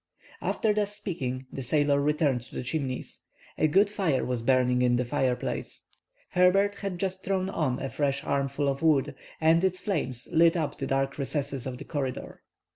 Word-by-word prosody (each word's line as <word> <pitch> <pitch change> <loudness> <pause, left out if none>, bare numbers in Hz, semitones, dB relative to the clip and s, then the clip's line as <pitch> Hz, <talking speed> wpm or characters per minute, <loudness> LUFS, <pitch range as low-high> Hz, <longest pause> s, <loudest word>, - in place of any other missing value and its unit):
After 215 -2 +1
thus 205 -1 0
speaking 135 -11 -4
the 135 - -4
sailor 145 +2 +2
returned 145 -3 +1
to - - -14
the - - -3
Chimneys. 130 -1 -3 0.4
A 155 - +4
good 195 +7 +4
fire 190 -10 0
was 125 -2 -2
burning 125 0 +3
in 125 -1 +3
the 125 +1 0
fireplace. 130 -1 -2 0.5
Herbert 195 +3 +4
had 195 -3 -5
just 190 0 -2
thrown 190 0 -1
on 135 -8 0
a 135 - -3
fresh 140 0 -1
armful 140 0 0
of 140 0 -1
wood, 145 -3 +3 0.3
and 165 +2 +4
its 185 -1 +1
flames 135 - -2
lit 165 +1 +5
up 155 -3 -2
the - - -2
dark 135 +1 -1
recesses 140 -2 -2
of 125 -1 -5
the - - -9
corridor. 135 -5 -4
145 Hz, 180 wpm, -28 LUFS, 130-180 Hz, 0.5 s, lit